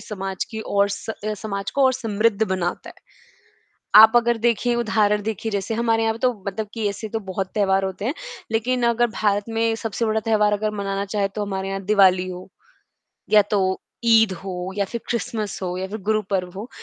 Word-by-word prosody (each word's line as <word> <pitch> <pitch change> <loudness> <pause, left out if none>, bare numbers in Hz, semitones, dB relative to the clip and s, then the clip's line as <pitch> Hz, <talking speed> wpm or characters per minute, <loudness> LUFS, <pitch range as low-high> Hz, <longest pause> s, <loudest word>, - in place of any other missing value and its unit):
समाज 195 -2 -4
की 220 - -5
और 200 -2 +1
स 200 - -6 0.2
अ, 215 0 -1
समाज 200 -1 -4
को 275 - +2
और 260 - +5
समृद्ध 225 -3 0
बनाता 185 -2 -2
है। - - -14 1.1
आप 220 +1 +8
अगर 235 0 +2
देखिए, 235 +1 +1
उदाहरण 215 -3 +2
देखिए, 220 +1 -3
जैसे 200 +2 -2
हमारे 225 0 +1
यहाँ 225 - +1
पे 225 - -10
तो, 250 0 +2
मतलब 210 +2 -3
कि 225 -3 -1
ऐसे 215 +2 -6
तो 225 - -2
बहुत 190 -1 -4
त्योहार 195 -2 +2
होते 190 +2 -5
हैं, 260 - 0 0.4
लेकिन 245 +3 0
अगर 235 +1 +2
भारत 205 -1 +2
में 225 0 +1
सबसे 225 0 -3
बड़ा 220 0 +1
त्योहार 210 -1 +2
अगर 215 +1 -1
मनाना 195 0 -2
चाहें, 200 -1 -1
तो 205 +1 -4
हमारे 195 -1 -3
यहाँ 195 0 -3
दिवाली 190 -3 +4
हो, 180 0 -8 0.8
या 210 - +7
तो 190 -2 +1 0.2
ईद 225 -3 +5
हो, 185 -1 -5
या 200 - +1
फिर 235 +3 -6
क्रिसमस 220 -3 -3
हो, 180 -1 -2
या 190 +1 -3
फिर 210 +3 -5
गुरु 215 0 +3
पर्व 185 -3 -1
हो। 225 +5 -7
210 Hz, 205 wpm, -22 LUFS, 195-225 Hz, 1.1 s, आप